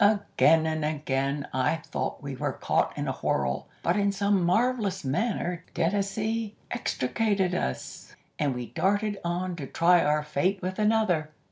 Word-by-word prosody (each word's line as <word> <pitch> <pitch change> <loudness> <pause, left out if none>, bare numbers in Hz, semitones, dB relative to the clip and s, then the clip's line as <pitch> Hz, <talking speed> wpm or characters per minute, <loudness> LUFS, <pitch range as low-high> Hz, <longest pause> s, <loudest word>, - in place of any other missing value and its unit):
Again 200 -6 +4
and 155 -1 -1
again 140 -2 -1
I 130 +5 +2
thought 165 - -4
we - - -4
were - - -2
caught - - 0
in - - -2
a - - +1
whirl, 65 -1 -1 0.2
but - - +2
in 200 0 +2
some 200 -1 +1
marvellous 200 - +1
manner 175 - -1
Dennazee 210 +4 -1 0.2
extricated 195 - 0
us, 65 0 -4 0.2
and 140 -4 +1
we 125 0 -4
darted 205 +1 0
on 175 +1 -2
to 140 -4 -5
try 175 +4 +4
our 150 0 +2
fate 180 +6 0
with 185 +2 -4
another. 210 -8 +2
180 Hz, 150 wpm, -27 LUFS, 150-205 Hz, 0.2 s, Again